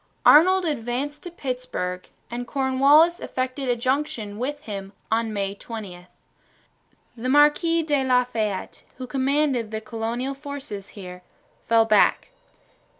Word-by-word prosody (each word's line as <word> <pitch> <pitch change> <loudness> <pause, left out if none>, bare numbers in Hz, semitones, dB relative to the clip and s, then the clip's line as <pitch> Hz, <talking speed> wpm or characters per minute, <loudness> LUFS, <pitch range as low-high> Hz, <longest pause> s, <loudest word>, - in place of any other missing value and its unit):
Arnold 370 +4 +6
advanced 280 0 -3
to 355 - -7
Petersburg 250 - -4 0.2
and 240 0 -4
Cornwallis 280 +6 +4
effected 255 +1 -3
a 245 - +3
junction 255 -4 -2
with 290 +4 -3
him 200 -6 -7 0.2
on 225 0 +1
May 200 -2 -2
20. 200 -5 -9 1.1
The 245 +2 -4
Marquis 300 +4 +4
de 290 -3 +1
la 250 -1 +3
Fayette, 215 -6 -3 0.2
who 255 - -6
commanded 270 -2 0
the 220 0 -4
colonial 230 +4 -3
forces 275 -8 -7
here, 180 -2 -9 0.5
fell 230 -1 +4
back. 215 - +3
250 Hz, 125 wpm, -24 LUFS, 220-285 Hz, 1.1 s, Arnold